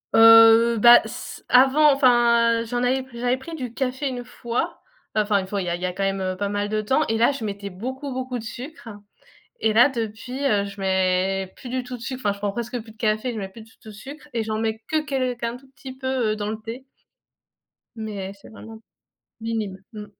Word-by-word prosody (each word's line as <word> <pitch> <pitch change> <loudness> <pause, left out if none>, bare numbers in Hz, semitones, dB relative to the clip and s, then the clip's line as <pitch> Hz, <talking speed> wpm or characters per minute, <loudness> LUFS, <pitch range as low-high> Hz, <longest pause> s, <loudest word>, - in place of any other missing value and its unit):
Heu, 225 +1 +8
bah 240 +3 +9
s - - -8
avant 270 +4 +6
enfin, 235 -4 +4
heu, - - -5
j'en 245 +1 -2
avais 260 +2 +1
pr 260 - -14
j'avais 245 +2 0
pris 325 +5 -8
du 250 -6 -6
café 260 +2 -2
1 250 -2 -4
fois, 240 0 -4 0.4
enfin 210 -1 +2
une 190 - -5
fois, 200 +1 -3
il - - -4
y - - -2
a 170 - 0
il 175 - -9
y 180 - 0
a 180 - -4
quand 195 - -3
même, 195 0 -1
heu, 185 0 -2
pas 200 +1 -2
mal 205 0 -2
de 215 0 0
temps 265 +8 +1
et 225 - 0
là, 235 +4 +4
je 275 -5 -6
mettais 200 -1 -5
beaucoup 260 +8 -6
beaucoup 255 -1 -4
de 225 - -7
sucre 250 +3 -9 0.7
et 220 - +3
là 235 +4 +6
depuis, 245 +1 -5
heu, 205 -6 +2
je 200 0 -9
mets 190 0 0
plus 255 - -10
du 255 +1 -2
tout 250 0 -7
de 240 - -12
sucre, 255 +2 -5
enfin, 205 - +2
je 200 - -13
prends 205 0 -1
presque 235 +3 -4
plus 220 0 -14
de 220 - -22
café, 215 +2 0
je 230 - -6
mets 195 - -4
plus 195 +4 -13
du 225 +1 -16
tout - - -16
de - - -10
sucre 280 +8 -11
et 230 -1 -1
j'en 215 0 -3
mets 220 0 -2
que 315 - +2
quel 255 -4 -1
qu'un 235 0 -3
tout 265 +2 -15
petit 260 +1 -10
peu, 260 0 -5 0.3
heu, - - -4
dans 210 -1 -4
le 220 - -3
thé 235 +4 -8 1.1
mais 205 -4 -5
c'est 200 - -16
vraiment, 220 0 -11 0.6
minime. 220 -4 -3
Mmh. 210 -1 -8
225 Hz, 245 wpm, -23 LUFS, 205-255 Hz, 1.1 s, bah